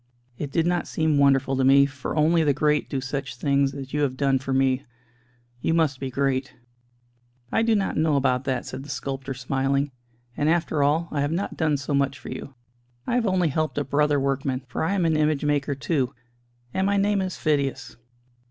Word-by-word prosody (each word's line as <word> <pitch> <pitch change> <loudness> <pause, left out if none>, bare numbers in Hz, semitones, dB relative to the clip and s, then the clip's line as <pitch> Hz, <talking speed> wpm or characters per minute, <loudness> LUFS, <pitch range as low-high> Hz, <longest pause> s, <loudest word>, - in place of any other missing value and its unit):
It 145 -2 -4
did 165 +1 +1
not 175 0 0
seem 155 -2 +1
wonderful 135 -1 +3
to 130 - +1
me, 140 +1 +6
for 140 -2 -5
only 160 +2 +3
the 145 -3 +2
great 150 0 +1
do 135 - -2
such 135 0 -4
things 140 +1 +1
as 135 -1 -8
you 150 - 0
have 130 -3 0
done 135 -1 +2
for 135 0 -5
me. 130 0 +2 0.8
You 165 - +1
must 155 -5 +1
be 135 - -3
great." 135 0 -1 1.0
"I - - +2
do 225 -1 +3
not 195 -2 -1
know 155 -1 +2
about 130 -2 +1
that," 130 -3 -1
said 130 - -6
the 145 - -11
sculptor, 135 -1 -4
smiling, 135 +2 0 0.4
"and 150 - +1
after 160 -2 +1
all, 155 +4 +2
I 145 - -1
have 145 +1 0
not 175 +5 -2
done 155 -3 +1
so 140 +1 -4
much 140 -1 +1
for 130 - -10
you. 140 - -7 0.5
I - - -2
have 240 -3 +2
only 185 -3 +2
helped 155 +1 -1
a 145 - +1
brother 145 +1 +2
workman: 135 -1 -1
for 120 - -3
I 195 +5 0
am 180 -3 +1
an 160 -1 +2
image 155 -1 +1
maker 145 -1 0
too 140 -2 -1 0.6
and 190 +1 +1
my 200 0 +2
name 200 0 +2
is 185 -1 -3
Phidias." 140 -3 -1
140 Hz, 205 wpm, -24 LUFS, 135-155 Hz, 1.0 s, me